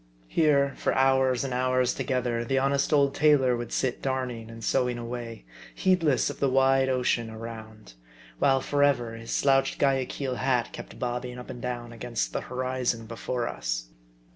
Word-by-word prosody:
Here 140 -3 +3
for - - 0
hours 130 -1 +3
and 135 -2 -3
hours 130 0 +1
together 125 -3 -1
the 135 +3 0
honest 140 +2 +1
old 140 -2 +4
tailor 145 -4 +4
would 120 -1 -5
sit 130 - -1
darning 125 -4 -3
and 115 0 -10
sewing 125 -1 +1
away, 120 - -6 0.3
heed 185 -1 +2
less 145 -6 +2
of - - -12
the 140 - +2
wide 135 0 +3
ocean 125 -3 0
around; 110 - -9 0.5
while 135 -1 +3
forever, 140 -5 +1
his 115 0 -9
slouched 135 -1 +2
Guayaquil 135 -1 0
hat 125 -2 0
kept - - -9
bobbing 125 0 -3
up 125 - -8
and 120 - -9
down 120 -1 -4
against 115 0 -3
the - - -1
hori 130 0 -3
zon 115 -2 0
before 115 +2 -3
us. - - -3
125 Hz, 165 wpm, -27 LUFS, 120-135 Hz, 0.5 s, old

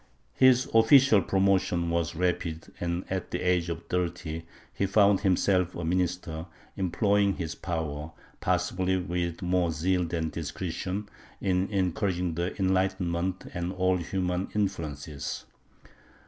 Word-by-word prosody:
His 130 -1 +5
official 115 -1 +6
promotion 95 -3 +1
was 85 0 -1
rapid 85 -2 -2
and, 85 +1 -2
at 95 -1 -3
the 90 - -2
age 90 -2 +1
of 85 - -5
thirty, 85 -2 -3 0.3
he 100 - 0
found 100 0 +4
himself 90 -2 +2
a 85 - -4
minister, 90 -2 -1 0.3
employing 100 +2 +2
his 80 -3 -4
power, 80 -3 -4 0.3
possibly 95 0 +1
with 90 -1 -2
more 90 -1 +2
zeal 90 +3 +1
than 80 -2 -2
discretion, 90 +5 -4 0.3
in 95 -1 +1
encouraging 90 -2 0 0.2
enlightenment 95 -1 0
and 85 +1 -2
all 95 0 +2
humanizing 90 +1 -2
influences. 80 -8 -3
90 Hz, 120 wpm, -28 LUFS, 85-95 Hz, 0.3 s, official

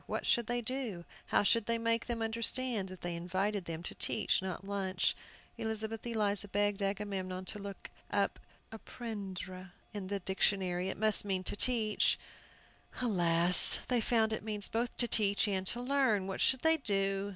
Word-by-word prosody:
What - - -3
should 235 -3 +2
they 240 0 -1
do? 230 -8 -3 0.2
How - - +3
should 230 +1 +2
they 230 0 +1
make 230 0 0
them 235 -2 -2
understand 230 -2 -1
that 185 -1 -10
they 175 -1 -3
invited 185 +3 -2
them 165 0 -5
to - - -6
teach, - - +1
not 190 0 -5
lunch. 195 -2 0 0.4
Elizabeth 220 0 -3
Eliza 210 -3 0
begged 205 0 0
Agamemnon 195 -2 -3
to 210 - -3
look 200 -1 -8 0.2
out - - 0 0.3
"apprendre" 190 -5 -7 0.2
in 200 -3 -5
the 200 +1 -2
dictionary. 190 -1 0
It - - -4
must 215 0 +3
mean 190 -2 -1
to - - -2
teach. 220 -2 +2 0.8
Alas, 175 -6 +4
they 245 -2 +2
found 220 -1 +2
it - - -3
means 210 -2 0
both 235 +2 -2
to 240 - +2
teach 205 -1 +2
and 190 -2 -1
to 235 - +1
learn! 250 -6 +2
What 190 0 -4
should 260 -1 +4
they 320 0 +4
do? 195 -5 0
205 Hz, 170 wpm, -33 LUFS, 190-230 Hz, 0.8 s, Alas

